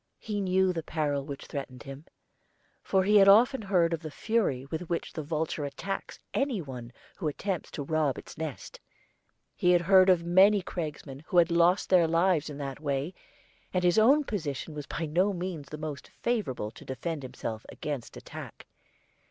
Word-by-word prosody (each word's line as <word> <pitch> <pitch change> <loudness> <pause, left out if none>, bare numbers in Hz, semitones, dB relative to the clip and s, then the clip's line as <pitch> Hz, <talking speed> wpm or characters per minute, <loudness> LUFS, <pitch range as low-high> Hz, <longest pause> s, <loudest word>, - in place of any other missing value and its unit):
He 205 -2 -3
knew 190 0 +2
the 165 - -2
peril 150 -3 -1
which 140 -2 -7
threatened 130 -4 -6
him, 135 +3 -9 0.8
for 190 -1 +2
he 210 +2 +5
had 195 -1 +7
often 235 +6 +6
heard 180 -5 +2
of 165 - -1
the 155 - -6
fury 155 - 0
with 160 +4 -5
which 170 - -2
the 160 - -4
vulture 155 0 -2
attacks 195 +7 -5 0.2
any 270 -6 0
one 125 -6 -7 0.3
who 175 - -2
attempts 180 +4 -3
to 145 - -5
rob 150 -2 0
its - - -10
nest. 160 -3 -6 0.8
He 180 - +2
had 175 - +4
heard 190 +1 +6
of 180 -2 +4
many 190 +3 +5
cragsmen 150 -6 -5
who 180 - 0
had 175 0 +5
lost 170 +3 +3
their 175 -3 +6
lives 165 -1 +2
in 145 - -7
that 140 -1 -5
way, 145 +3 -2 0.6
and 180 - +2
his 175 +4 +4
own 275 +7 +5
position 160 - -4
was 150 -1 -7
by 165 - -3
no 180 +6 +2
means 175 -6 -5
the 150 - -6
most 150 -3 -6
favorable 135 - -2
to - - -13
defend 145 +4 -4
himself 125 -4 -6
against 145 -6 -5
attack. - - -10
165 Hz, 180 wpm, -29 LUFS, 145-190 Hz, 0.8 s, had